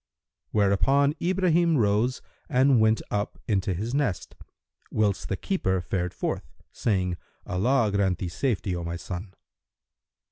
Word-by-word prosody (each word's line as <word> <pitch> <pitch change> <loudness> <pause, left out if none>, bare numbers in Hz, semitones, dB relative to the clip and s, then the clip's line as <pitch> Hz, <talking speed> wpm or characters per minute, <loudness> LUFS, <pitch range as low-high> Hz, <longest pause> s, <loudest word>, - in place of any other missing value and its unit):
Hereupon 135 +8 +3
Ibrahim 175 -3 +2
rose 110 +3 +1 0.3
and 130 -1 +4
went 110 0 +3
up 105 +2 -2
into 100 -3 +1
his 110 +7 -3
nest, 135 -10 -1 0.6
whilst 105 -3 0
the 95 - -1
keeper 95 - 0
fared 90 +1 -3
forth, - - -3 0.2
saying, 90 -5 0 0.3
"Allah 110 +4 +2
grant 95 -3 +2
thee 90 - -3
safety, 100 -1 -1
O 85 - -4
my 85 0 -4
son!" 90 +2 -7
105 Hz, 130 wpm, -26 LUFS, 95-130 Hz, 0.6 s, and